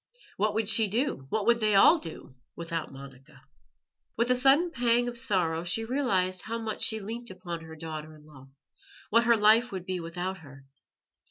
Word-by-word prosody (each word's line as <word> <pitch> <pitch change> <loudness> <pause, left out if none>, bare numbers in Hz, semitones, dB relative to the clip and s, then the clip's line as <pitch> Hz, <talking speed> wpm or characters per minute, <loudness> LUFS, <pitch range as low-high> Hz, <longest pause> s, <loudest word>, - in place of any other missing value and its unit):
What 210 +1 0
would 220 -1 0
she 220 0 +4
do, 220 - -2
what 215 +3 -1
would 235 0 +3
they 215 -2 +2
all 320 - +6
do, 160 - -10 0.2
Without 165 -1 -5
Monica? 135 0 -14 0.7
With 235 +2 +1
a - - +4
sudden 275 +7 +3
pang 245 -3 +1
of 240 - -5
sorrow 185 -10 0
she 175 +6 -1
realized 195 -8 0
how 230 +1 -5
much 225 -1 -5
she 220 - +1
leant 230 +3 -6
upon 180 -3 -7
her 160 0 -11
daughter 155 -1 -8
in 150 0 -18
law, 135 -3 -16 0.6
what 230 +2 +4
her 235 -1 +4
life 220 +4 +4
would 185 -2 -6
be 185 -1 -3
without 175 +3 -5
her. 135 -4 -15
195 Hz, 185 wpm, -28 LUFS, 165-235 Hz, 0.7 s, all